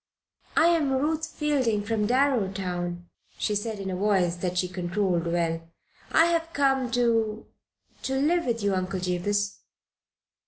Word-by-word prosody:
"I 335 - +6
am 310 -5 +2
Ruth 310 +4 0
Fielding, 265 -10 0
from 210 0 0
Darrowtown," 190 -9 0 0.3
she 210 - 0
said, 210 +1 -2
in 190 -1 -4
a - - -2
voice 185 -3 +2
that 180 0 -2
she 180 - +2
controlled 180 -1 -1
well. 165 -1 0 0.5
"I 325 - +6
have 335 -1 0
come 270 -3 +2
to 225 -3 +1 0.6
to 265 - -2
live 325 +5 +2
with 230 -3 -1
you, 200 -1 +2
Uncle 185 0 -1
Jabez." 200 +3 -1
210 Hz, 145 wpm, -26 LUFS, 185-265 Hz, 0.6 s, I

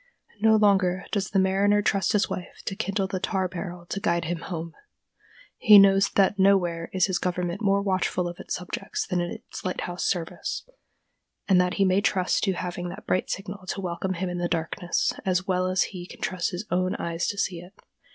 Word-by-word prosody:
No 220 +1 +5
longer 195 -3 +3
does 200 -2 -1
the 200 - 0
mariner 200 +2 +3
trust 195 -3 +1
to - - +2
his 205 - +3
wife 180 - -7
to 195 - -3
kindle 200 -1 -1
the 190 -1 -3
tar 190 0 0
barrel 175 -1 -7
to 195 - -4
guide 170 -3 0
him 170 +1 -2
home. 165 -1 -6 0.9
He 215 -4 +8
knows 195 0 +6
that 200 0 +3
nowhere 180 -4 +3
is 185 -2 +3
his 185 -3 -1
government 180 +1 -2
more 200 -1 +2
watchful 185 -2 0
of 175 0 -7
its - - -4
subjects 180 0 -4
than 180 -2 -1
in 175 - -2
its - - -9
lighthouse 180 -1 -3
service, 170 -4 -2 0.8
and 185 -2 +5
that 180 0 0
he 195 - +3
may 190 +1 +3
trust 185 -3 +1
to 195 - +1
having 175 0 -4
that - - -9
bright 185 - 0
signal 195 0 -5
to 195 - -3
welcome 185 +1 -2
him 185 +1 -3
in 175 0 -3
the 175 - 0
darkness, 170 +1 -1
as 185 0 0
well 185 -1 +1
as 185 0 +2
he 180 -2 -7
can - - -12
trust 180 -2 -1
his 180 +3 -5
own 185 +1 +1
eyes 170 +1 -2
to 205 - -3
see 180 -3 -1
it. 175 +3 -13
185 Hz, 210 wpm, -26 LUFS, 175-195 Hz, 0.9 s, He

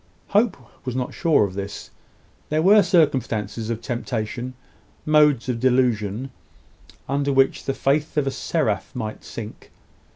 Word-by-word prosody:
Hope 210 +1 +2 0.3
was 125 -2 -4
not 125 -1 -2
sure 160 -9 +3
of 100 -2 -2
this. 100 +1 -6 0.6
There 155 +1 +1
were 205 +3 +7
circumstances 120 - +1
of 115 0 -3
temptation, 120 +1 -4 0.5
modes 150 -5 +4
of 125 -2 -1
delusion, 125 -2 +1 0.8
under 140 +1 0
which 135 0 +2
the 135 - -1
faith 150 +3 0
of 145 - +2
a 135 - 0
seraph 130 -9 -1
might 110 -3 -5
sink. 110 -2 -9
130 Hz, 135 wpm, -23 LUFS, 115-150 Hz, 0.8 s, were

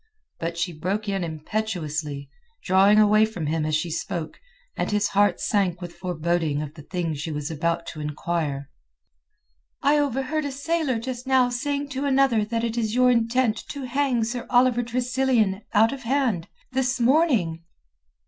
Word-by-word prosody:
But 165 0 -3
she 175 +1 -1
broke 195 +7 -2
in 195 -2 -1
impetuously, 155 -4 -3 0.4
drawing 195 +3 +5
away 215 0 +6
from 215 -7 -2
him 155 +1 0
as 155 - +1
she 165 +2 -1
spoke, 160 0 -4 0.4
and - - -1
his 210 -1 +1
heart 200 -2 +3
sank 190 -4 0
with 175 -2 -7
foreboding 170 -4 -1
of 150 -1 -7
the 155 - -11
thing 170 +1 -3
she 150 +2 -4
was 150 +1 -4
about 170 +2 -1
to 155 - -7
inquire. 150 -2 -3 1.1
"I 290 +2 +4
overheard 285 +2 -1
a 285 - -2
sailor 285 -1 -1
just 250 +2 -5
now 260 -2 +4
saying 285 +3 -2
to 275 +1 -3
another 270 -5 +3
that 230 +2 -2
it 235 0 -1
is 220 0 -1
your 250 0 +5
intent 230 -1 +2
to 280 -2 -5
hang 255 -2 +1
Sir 235 +2 -4
Oliver 245 -1 +4
Tressilian 245 -4 +1
out 225 +4 +4
of 275 - -7
hand—this 255 +1 -1
morning." 235 - +2
215 Hz, 160 wpm, -24 LUFS, 170-255 Hz, 1.1 s, away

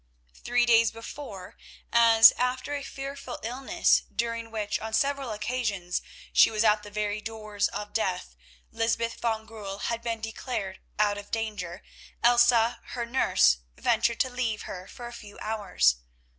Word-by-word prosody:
Three 245 - +1
days 230 -1 +5
before, 225 -4 -9 0.4
as 230 -1 +8
after 255 +3 -2
a 285 - -2
fearful 275 -1 -7
illness 265 +9 +2
during 230 0 -2
which 215 -2 -2
on 220 0 -6
several 275 +2 +1
occasions 210 -5 -2 0.3
she - - +7
was 215 0 0
at 210 -1 +4
the 210 - -10
very 210 0 -2
doors 215 -2 -2
of 205 +1 -6
death, 185 - -2 0.4
Lysbeth 230 0 -1
van 220 -2 -1
Goorl 205 -3 -7 0.2
had 230 - -4
been 230 -1 -3
declared 220 -3 -5 0.2
out 205 -1 +2
of 205 - -11
danger, 210 -5 -4 0.4
Elsa, 240 -1 +5
her 240 -1 -4
nurse, 235 - +3 0.2
ventured 230 0 +1
to 260 - 0
leave 240 -4 -2
her 185 0 -8
for 245 +2 -10
a 240 - -8
few 210 -3 -11
hours. 205 - +1
225 Hz, 150 wpm, -27 LUFS, 210-240 Hz, 0.4 s, as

